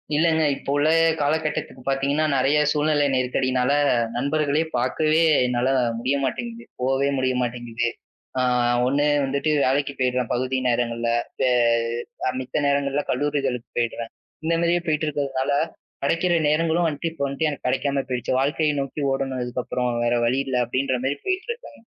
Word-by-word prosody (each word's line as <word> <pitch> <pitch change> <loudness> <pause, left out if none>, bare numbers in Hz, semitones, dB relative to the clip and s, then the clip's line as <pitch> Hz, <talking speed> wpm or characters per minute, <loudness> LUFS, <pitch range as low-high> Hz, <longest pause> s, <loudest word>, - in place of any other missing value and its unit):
இல்லைங்க. 160 +1 +3
இப்போ - - -9
உள்ள 145 +2 +3 0.3
கால 145 +1 +2
கட்டத்துக்குப் 145 -4 -4
பார்த்தீங்கன்னா 140 +3 +1
நிறைய 135 +3 +3
சூழ்நிலை 150 -1 +2
நெருக்கடினால 130 0 +1 0.4
நண்பர்களைப் 150 +4 0
பாக்கவே 155 +6 +2 0.3
என்னால 125 +1 0 0.3
முடிய 130 +4 0
மாட்டிங்கிது. 235 - -4 0.2
போவே 135 +2 +1
முடிய 130 0 +1
மாட்டிங்கிது. 120 -1 -2 0.5
ஆ - - +2 0.5
1 145 +2 +2 0.2
வந்துட்டு 140 +3 0
வேலைக்கு 140 +2 +1
போயிருவேன் 125 -1 0
பகுதி 130 +2 -1
நேரங்கள்ல. 120 -1 0 1.2
அ. - - +2
மித்த 130 - -4
நேரங்கள்ல 140 0 +1
கல்லூரிகளுக்கு 135 -3 -1
போயிடுவேன். 115 -1 -2 0.3
இந்த 165 - +1
மாரியே 170 +1 +2
போயிட்டு 155 0 0
இருக்கறதுனால 140 -2 -1 0.5
கிடைக்கிற 165 +5 +1 0.2
நேரங்களும் 165 +2 +2
வந்துட்டு, 155 +2 -2
இப்ப 145 -4 -5
வந்துட்டு 140 +3 -1
எனக்குக் 140 -3 -5
கிடைக்காம 140 +1 0
போயிடுச்சு. 125 -1 -2
வாழ்க்கையை 150 +2 +1
நோக்கி 135 +2 -5
ஓடணும் 135 -1 -2
இதுக்கப்புறம் 125 0 -2 0.2
வேற 120 - +2
வழி 125 +3 +1
இல்ல 130 - 0
அப்படின்ற 130 +2 0
மாரி 135 +2 0
போயிட்டு 380 +4 -2
இருக்கேங்க. 470 - -10
140 Hz, 140 wpm, -23 LUFS, 125-150 Hz, 1.2 s, இல்லைங்க